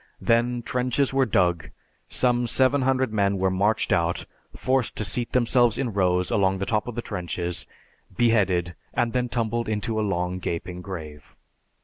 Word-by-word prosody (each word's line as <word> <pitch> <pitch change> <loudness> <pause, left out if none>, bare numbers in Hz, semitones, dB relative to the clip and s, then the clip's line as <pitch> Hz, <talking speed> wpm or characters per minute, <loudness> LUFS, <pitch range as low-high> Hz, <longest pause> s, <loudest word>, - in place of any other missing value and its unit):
Then, 120 +1 +1
trenches 125 +3 0
were 135 -1 +3
dug, 90 -5 +1 0.4
some 120 -1 +2
seven 130 +3 +3
hundred 130 -3 +1
men 100 -2 +1
were 95 0 +1
marched 100 +3 +1
out, 85 -1 0 0.3
forced 130 -2 0
to 105 - -3
seat 120 +3 -2
themselves 120 -1 +3
in 125 -5 -2
rows 90 -2 +1
along 95 -2 +2
the 100 - -2
top 105 +1 0
of 120 - -5
the 120 - -3
trenches, 90 -3 -4 0.5
beheaded, 95 -7 +2 0.2
and 120 -1 +1
then 125 -1 0
tumbled 115 -1 -1
into 110 +1 -1
a - - +1
long 90 -3 -1
gaping 90 +1 -4
grave. 80 -6 -9
110 Hz, 160 wpm, -25 LUFS, 90-120 Hz, 0.5 s, were